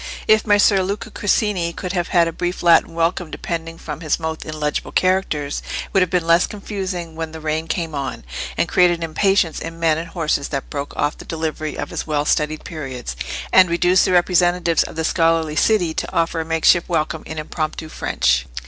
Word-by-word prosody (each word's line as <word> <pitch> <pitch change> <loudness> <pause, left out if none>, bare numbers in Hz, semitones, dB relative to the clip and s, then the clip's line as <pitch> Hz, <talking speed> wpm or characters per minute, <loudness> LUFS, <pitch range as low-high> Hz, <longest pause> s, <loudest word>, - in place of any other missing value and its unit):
If 215 0 +4
Messer 205 -1 +5
Luca 200 +3 -4
Corsini 205 -4 0
could 180 +1 -5
have 175 -2 -1
had 170 -2 +3
a - - -2
brief 175 +2 -3
Latin 170 -1 +4
welcome 170 0 0
depending 165 0 -5
from 155 -2 -7
his 155 0 0
mouth 160 -1 -4
in 155 0 -7
legible 150 -1 -2
characters, 185 -6 0 0.2
it - - -20
would 195 - +4
have 180 - +2
been 180 -2 0
less 170 +1 +4
confusing 190 -5 -5
when 160 -1 -5
the 160 - -7
rain 155 +1 -2
came 165 -1 -2
on, 140 - -4 0.3
and - - +1
created 175 -1 +4
an 165 - -6
impatience 170 +1 +1
in 165 0 -7
men 160 -2 +2
and 165 - -6
horses 155 -4 -1
that 140 -2 -5
broke 140 0 -5
off 145 +1 -1
the - - -8
delivery 155 -1 -4
of 145 - -5
his - - -4
well 150 -1 0
studied 150 +1 0
periods, 130 - -6 0.4
and 185 -2 +7
reduced 175 +2 +3
the - - +1
representatives 175 -1 +3
of - - -4
the 160 - -2
scholarly 165 -2 +2
city 180 -3 +2
to - - -3
offer 165 0 0
a 160 - -2
makeshift 165 +1 +3
welcome 160 -1 -1
in 160 - -7
impromptu 155 0 -4
French. 65 - 0
165 Hz, 200 wpm, -20 LUFS, 155-180 Hz, 0.4 s, and